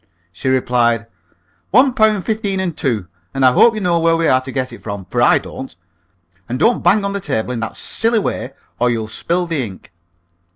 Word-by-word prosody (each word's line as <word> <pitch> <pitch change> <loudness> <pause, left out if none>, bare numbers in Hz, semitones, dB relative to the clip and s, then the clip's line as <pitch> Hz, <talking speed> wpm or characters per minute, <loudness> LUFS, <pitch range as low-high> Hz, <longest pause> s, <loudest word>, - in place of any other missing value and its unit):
She 90 +10 -3
replied, 120 -3 +1 0.6
"One 255 +4 +4
pound 215 -4 +2
fifteen 210 -3 -1
and 180 -4 -2
two, 115 -9 -1 0.3
and 135 -1 +2
I 130 - +7
hope 225 - +5
you 215 - -3
know 175 -2 +2
where 165 0 +3
we 165 -1 +1
are 130 0 +3
to 130 +1 -7
get 130 -2 -3
it - - -11
from, 100 -3 -6
for - - -2
I - - +5
don't. - - -8 0.7
And 125 - -2
don't 230 - +2
bang 200 +4 +3
on 200 - -2
the 200 - -2
table 125 - -2
in 120 - -3
that 110 - -5
silly 230 +1 0
way, 210 - -2 0.3
or 125 - +3
you'll 115 -2 -2
spill 175 +10 -1
the 165 -6 -1
ink." 95 -4 -10
140 Hz, 210 wpm, -18 LUFS, 120-200 Hz, 0.7 s, I